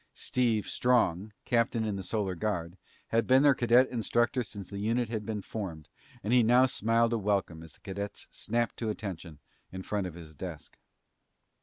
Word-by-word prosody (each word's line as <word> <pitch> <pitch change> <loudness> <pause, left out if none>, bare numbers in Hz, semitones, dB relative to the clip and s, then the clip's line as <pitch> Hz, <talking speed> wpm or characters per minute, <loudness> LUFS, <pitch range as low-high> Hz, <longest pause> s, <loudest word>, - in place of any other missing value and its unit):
Steve 115 -4 0
Strong, 110 -5 +1
captain 115 -1 +1
in 105 -2 -1
the 95 - -4
Solar 100 -1 -2
Guard, 90 -3 -2 0.3
had 115 0 +1
been 130 +2 +6
their 145 -1 +7
cadet 125 +1 +4
instructor 120 +1 +1
since 100 -5 -7
the 100 - -6
unit 115 +3 0
had 110 -2 -4
been 105 -3 -3
formed 85 -8 -6 0.3
and 110 - 0
he 125 - +7
now 120 +3 +5
smiled 115 -1 +2
a 115 - +1
welcome 100 -5 -1
as 80 - -11
the - - -18
cadets 100 +1 -6
snapped 120 0 -1
to 115 - -2
attention 95 -7 -6 0.3
in 95 0 -6
front 100 -2 -2
of 85 - -9
his 80 -3 -11
desk. 80 -1 -8
105 Hz, 180 wpm, -30 LUFS, 95-120 Hz, 0.3 s, their